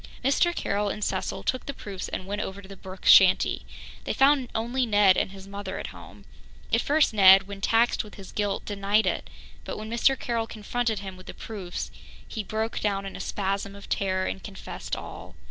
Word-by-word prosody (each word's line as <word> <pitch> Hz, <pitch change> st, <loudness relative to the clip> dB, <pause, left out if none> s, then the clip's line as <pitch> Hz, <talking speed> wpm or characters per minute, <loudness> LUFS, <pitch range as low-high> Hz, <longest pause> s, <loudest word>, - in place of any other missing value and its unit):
Mr. 345 Hz, +6 st, +3 dB
Carroll 205 Hz, +1 st, -1 dB
and 210 Hz, -, -4 dB
Cecil 190 Hz, 0 st, -2 dB
took 255 Hz, -, -2 dB
the 280 Hz, -, -4 dB
proofs 195 Hz, -3 st, -6 dB
and 185 Hz, -, -4 dB
went 205 Hz, +2 st, -3 dB
over 190 Hz, -1 st, -5 dB
to 195 Hz, -, -12 dB
the 195 Hz, -, -10 dB
Brooke 190 Hz, 0 st, -11 dB
shanty. 185 Hz, -1 st, +6 dB, 0.4 s
They -, -, -2 dB
found 270 Hz, -2 st, +4 dB
only 240 Hz, +3 st, 0 dB
Ned 205 Hz, -3 st, +5 dB
and -, -, +1 dB
his 195 Hz, 0 st, -11 dB
mother 200 Hz, -1 st, -6 dB
at -, -, -6 dB
home. -, -, -13 dB, 0.5 s
At -, -, +4 dB
first 295 Hz, -4 st, +3 dB
Ned, 195 Hz, -2 st, +8 dB
when 200 Hz, -1 st, -8 dB
taxed 230 Hz, +3 st, +3 dB
with 210 Hz, -, -13 dB
his 195 Hz, -2 st, -11 dB
guilt, 205 Hz, -2 st, -2 dB
denied 205 Hz, +1 st, +1 dB
it, -, -, -1 dB, 0.3 s
but -, -, -5 dB
when 215 Hz, +1 st, -7 dB
Mr. 260 Hz, +3 st, +3 dB
Carroll 230 Hz, -2 st, -2 dB
confronted 220 Hz, 0 st, -2 dB
him 190 Hz, -2 st, -7 dB
with 185 Hz, -, -14 dB
the -, -, -8 dB
proofs, 195 Hz, -5 st, -6 dB, 0.4 s
he 220 Hz, -, -4 dB
broke 220 Hz, +2 st, -2 dB
down 195 Hz, -2 st, -1 dB
in 195 Hz, -, -7 dB
a -, -, -7 dB
spasm 195 Hz, 0 st, -2 dB
of 200 Hz, -, -12 dB
terror 185 Hz, -1 st, 0 dB
and 190 Hz, -, -4 dB
confessed 200 Hz, -2 st, -6 dB
all. -, -, -9 dB
205 Hz, 205 wpm, -26 LUFS, 195-225 Hz, 0.5 s, Ned